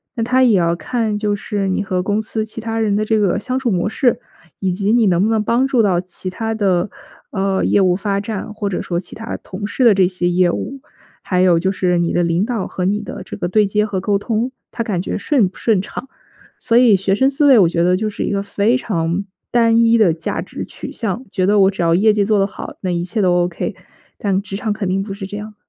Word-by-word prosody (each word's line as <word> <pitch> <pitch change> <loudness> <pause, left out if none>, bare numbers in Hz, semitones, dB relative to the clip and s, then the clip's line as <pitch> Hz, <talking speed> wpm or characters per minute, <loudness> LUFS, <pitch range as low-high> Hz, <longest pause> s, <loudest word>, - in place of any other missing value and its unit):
那 230 - -1
它 255 +2 +3
也 225 -6 +5
要 170 -1 +2
看， 220 +2 -2
就 210 -1 0
是 205 -1 -2
你 190 - 0
和 185 -2 -2
公 205 +2 0
司 220 0 -3
其 220 - -7
他 225 0 -3
人 210 -2 +1
的 215 - 0
这 220 0 +1
个 200 -4 +1
相 255 0 -2
处 255 -4 0
模 180 +1 0
式， 245 +2 +1 0.4
以 190 - 0
及 195 +3 0
你 235 -1 +4
能 180 +1 +3
不 220 - +2
能 220 -1 +2
帮 235 +5 +1
助 255 -4 +2
到 180 -4 +2
其 185 0 -7
他 225 +4 -3
的， 190 -3 +1 0.4
呃， 195 -1 0
业 - - +3
务 180 -2 +3
发 200 0 -1
展， 210 0 -5
或 210 -1 -3
者 195 - -2
说 170 - -2
其 175 - -9
他 225 +1 -5
同 195 +2 -7
事 250 +5 0
的 225 - +7
这 190 -1 +4
些 180 -1 -2
业 175 0 +3
务， 275 0 -5 0.4
还 180 - 0
有 180 -2 +4
就 190 +3 +1
是 180 -2 +1
你 170 -1 0
的 175 - +1
领 170 +2 +1
导 225 -4 -2
和 185 - -4
你 200 +3 +1
的 - - -7
这 - - -8
个 175 - -2
对 210 +3 +3
接 210 +2 +1
和 195 -3 -3
沟 200 0 +1
通， 230 +4 -2 0.2
他 230 - -3
感 195 -6 -2
觉 - - -3
顺 245 -2 +2
不 180 - -12
顺 215 -5 +2
畅。 265 +6 -8 0.5
所 230 - +2
以 240 -5 +6
学 195 +1 +1
生 265 +5 +3
思 290 +2 +2
维 265 -4 +7
我 175 - +5
觉 170 0 0
得 180 +1 +3
就 215 +2 -1
是 - - -4
一 - - -2
个 200 0 -1
非 205 +4 +1
常 175 -5 -2 0.3
单 230 -1 +4
一 230 0 +4
的 200 -7 +4
价 160 0 -3
值 - - -7
取 - - -9
向， 225 +2 -3
觉 185 -3 0
得 205 +1 +3
我 195 +1 +5
只 190 - -5
要 165 0 +3
业 215 +4 +4
绩 210 -1 +1
做 210 0 +2
得 195 - +3
好， 195 - -9
那 185 - -2
一 175 -1 -1
切 215 +3 -2
都 180 -2 +3
OK， 175 -1 -4 0.4
但 195 -2 0
职 195 -1 -6
场 210 +1 -1
肯 200 -3 -3
定 190 +1 0
不 195 0 -5
是 195 0 -6
这 205 +2 -6
样。 210 +1 -8
200 Hz, 285 characters per minute, -18 LUFS, 185-220 Hz, 0.5 s, 的